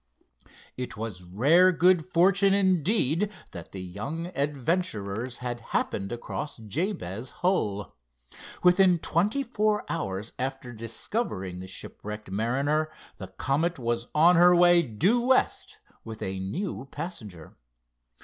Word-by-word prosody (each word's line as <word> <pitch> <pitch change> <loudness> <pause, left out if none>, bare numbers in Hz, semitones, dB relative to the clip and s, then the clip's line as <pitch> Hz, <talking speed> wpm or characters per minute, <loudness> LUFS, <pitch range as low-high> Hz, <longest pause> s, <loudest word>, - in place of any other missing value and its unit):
It 125 -4 -5
was 105 -4 -5
rare 145 - +4
good 180 -1 +4
fortune, 195 +3 +3
indeed, 190 - +2 0.2
that 85 -3 -9
the 95 -1 -6
young 140 - -5
adventurers 130 - -2
had 120 -1 -3
happened 100 -3 -2
across 120 +5 -5
Jabez 120 - -3 0.2
Hull. 105 - 0 0.7
Within 180 0 +5
twenty 205 - 0
four 215 -4 0
hours 105 - -3
after 130 -1 -4
discovering 115 - -4
the 95 - -8
shipwrecked 105 +2 -8
mariner 140 +9 0 0.3
the 95 - -6
Comet 140 - -1
was 120 -1 -2
on 170 +3 +6
her 175 +1 +7
way 175 0 +6
due 170 - +1
west, 260 - +1 0.3
with 110 -1 -7
a 95 0 -3
new 135 - -4
passenger. 115 - -8
140 Hz, 120 wpm, -27 LUFS, 105-180 Hz, 0.7 s, her